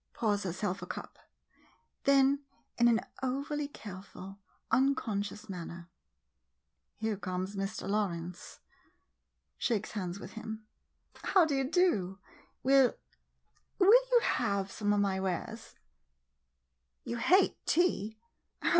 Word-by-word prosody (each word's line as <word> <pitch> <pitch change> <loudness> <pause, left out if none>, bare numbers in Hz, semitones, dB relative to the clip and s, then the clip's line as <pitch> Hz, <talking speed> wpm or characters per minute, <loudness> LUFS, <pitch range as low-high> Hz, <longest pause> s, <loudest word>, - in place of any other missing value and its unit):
[Pours 210 -3 +1
herself 190 +1 -2
a - - -6
cup - - -7 0.4
— - - -35
then 275 +1 +4 0.4
in 240 - +6
an 230 -1 +4 0.2
over 275 +3 -2
carefully 195 -5 -9 0.4
unconscious 220 -6 +1
man 180 -4 -5
ner.] 170 0 -10 1.1
Here 220 -1 -1
comes 185 0 -4
Mr. 195 0 -3
Lawrence. 180 -4 -3 1.0
[Shakes 220 -3 0
hands 185 -3 -4
with - - -9
him.] 220 -1 -7 0.6
How 375 -4 +4
do 305 - -1
you 270 -1 0
do? 215 - +2 0.5
Will 270 -1 +5 0.4
— - - -42
will 395 +2 +7 0.2
you 485 -1 +6
have 200 -5 0
some 205 -1 0
of 205 - +3
my 195 -1 +1
wares? 195 +5 -4 1.3
You 235 - -3
hate 370 +11 +3
tea? 220 - +2
215 Hz, 120 wpm, -32 LUFS, 195-265 Hz, 1.3 s, will